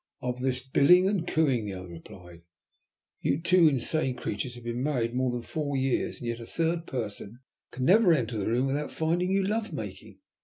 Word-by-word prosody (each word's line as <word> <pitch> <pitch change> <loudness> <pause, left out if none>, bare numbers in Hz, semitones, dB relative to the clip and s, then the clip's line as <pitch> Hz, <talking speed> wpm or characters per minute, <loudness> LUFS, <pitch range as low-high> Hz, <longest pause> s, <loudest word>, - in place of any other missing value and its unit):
"Of 125 0 -3
this 130 0 0
billing 180 +8 +5
and 190 -4 -1
cooing," 135 -8 +2
the 100 -2 -5
other 90 -1 -8
replied. 85 0 -12 0.8
"You 140 - 0
two 170 0 +5
insane 135 -1 0
creatures 120 +4 -4
have 120 - -11
been 120 +1 -3
married 125 -5 0
more 130 0 0
than 120 -1 -4
four 145 -1 -3
years, 135 -1 0
and 120 - -7
yet 115 0 -3
a 115 - -8
third 165 0 -1
person 110 -2 -5 0.3
can 125 +1 -4
never 195 +2 +6
enter 115 -8 0
the 100 - -2
room 120 +4 +1
without 145 +2 -2
finding 175 +3 0
you 195 0 +2
love 215 +3 -1
making. - - -7
130 Hz, 195 wpm, -28 LUFS, 120-165 Hz, 0.8 s, never